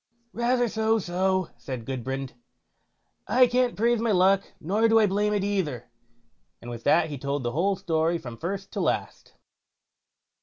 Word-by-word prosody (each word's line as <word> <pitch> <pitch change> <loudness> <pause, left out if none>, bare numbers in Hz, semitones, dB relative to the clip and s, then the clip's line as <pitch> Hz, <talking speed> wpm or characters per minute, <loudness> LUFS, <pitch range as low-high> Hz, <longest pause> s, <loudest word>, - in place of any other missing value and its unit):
"Rather 245 +1 +1
so 220 0 +1
so", 185 -1 0
said 125 -4 -6
Gudbrand, 135 +1 -4 0.9
"I 250 +4 +5
can't 245 0 +1
praise 235 +2 +2
my 230 0 +1
luck, 190 +1 +4 0.2
nor 205 +8 +1
do 225 0 +4
I 220 - +5
blame 205 +1 +1
it 205 -2 0
either", 155 -13 -2 0.7
and 120 - -9
with 120 -1 -8
that 160 -1 +4
he 145 - -5
told 140 0 -2
the 120 - -1
whole 185 +8 +1
story 170 -3 0
from 120 -7 -9
first 195 +3 -4
to - - -4
last. - - -2
190 Hz, 160 wpm, -26 LUFS, 140-220 Hz, 0.9 s, I